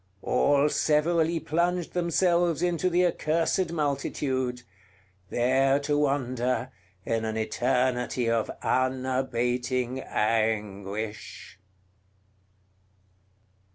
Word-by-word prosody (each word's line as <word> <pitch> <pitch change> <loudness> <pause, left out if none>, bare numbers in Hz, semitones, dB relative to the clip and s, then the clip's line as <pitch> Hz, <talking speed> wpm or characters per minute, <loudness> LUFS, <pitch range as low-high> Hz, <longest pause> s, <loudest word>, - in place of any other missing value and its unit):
All 145 0 +3
severally 160 +2 +2
plunged 175 +2 -1
themselves 175 -1 +1
into 180 +1 +1
the 180 +1 +3
accursed 165 +1 0
multitude, 135 -4 -2 0.7
there 135 +3 +2
to 145 +1 0
wander 130 -3 0 0.3
in 115 -1 -1
an 110 0 -2
eternity 125 +1 0
of 115 -1 +1
unabating 130 -1 0
anguish. 105 -3 -2
130 Hz, 75 wpm, -27 LUFS, 120-160 Hz, 0.7 s, All